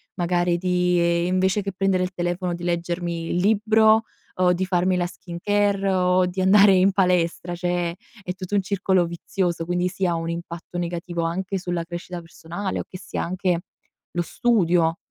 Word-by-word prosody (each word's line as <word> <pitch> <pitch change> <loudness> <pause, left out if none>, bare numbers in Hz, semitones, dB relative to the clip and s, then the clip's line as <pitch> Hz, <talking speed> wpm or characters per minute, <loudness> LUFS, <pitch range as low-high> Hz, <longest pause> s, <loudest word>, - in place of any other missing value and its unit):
magari 175 -1 +1
di, 180 0 +1
ehm, 170 0 +2
invece 185 +2 +1
che 195 0 -4
prendere 190 0 +1
il 180 - -3
telefono 175 0 -2
di 175 0 -7
leggermi 170 -1 -2
il - - -1
libro, 220 +3 +4 0.4
o 180 -1 +5
di 185 +2 -1
farmi 185 0 +1
la 180 -1 +1
skincare, 195 +3 -1
o 180 0 +3
di 180 +1 -3
andare 195 +1 +6
in 190 +1 +4
palestra; 180 -2 +1
cioè 175 -1 -1 0.3
è 180 - -3
tutto 185 +2 -5
un 200 - +3
circolo 190 -2 +1
vizioso, 170 0 -2
quindi 175 +1 0
sì 190 +1 -2
ha 170 - +1
un 165 0 -3
impatto 170 +1 -6
negativo 170 0 -3
anche 185 +4 -2
sulla 175 -2 -2
crescita 175 +1 -6
personale 170 +3 -5
o - - -2
che 185 - -9
sia - - -5
anche 180 -1 -1 0.5
lo 175 - -1
studio. 175 -5 +2
180 Hz, 175 wpm, -23 LUFS, 175-190 Hz, 0.5 s, andare